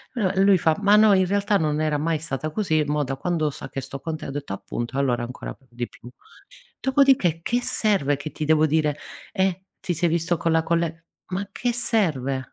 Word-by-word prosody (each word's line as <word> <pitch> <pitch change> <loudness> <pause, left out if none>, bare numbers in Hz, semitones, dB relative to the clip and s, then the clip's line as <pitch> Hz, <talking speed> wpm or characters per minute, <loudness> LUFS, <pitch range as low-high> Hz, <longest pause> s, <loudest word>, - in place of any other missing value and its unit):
uhm, 195 -3 +1
lui 195 -2 +6
fa: 160 -1 +3
"Ma 205 +1 +5
no, 215 -1 +6
in 190 -1 +4
realtà 200 +1 +2
non 155 -2 0
era 155 -1 +1
mai 155 +1 0
stata 155 -1 -4
così, 160 -5 +1
mo 150 0 0
da 135 0 -3
quando 165 -4 0
sa - - -9
che 135 - -4
sto 140 - -7
con 160 -1 -3
te" - - -8
ho - - -5
detto: 145 -8 -5
"Appunto, 120 +5 -5
allora 125 -4 +1
ancora 125 +1 -6
p - - -27
di 120 0 -4
più". 120 - -13 0.7
Dopodiché 265 - +3
che 240 +5 0
serve 190 - +1
che 145 +2 -6
ti 155 - -4
devo 155 0 +4
dire: 150 -1 +1 0.4
"Eh 190 -1 0 0.2
ti 175 - -2
sei 170 +1 +1
visto 170 +1 +1
con 165 -1 0
la 165 0 +3
colle" 165 -1 -1 0.3
ma 195 +2 -1
a 200 - -9
che 245 -1 -1
serve? 165 - 0
160 Hz, 220 wpm, -24 LUFS, 145-195 Hz, 0.7 s, lui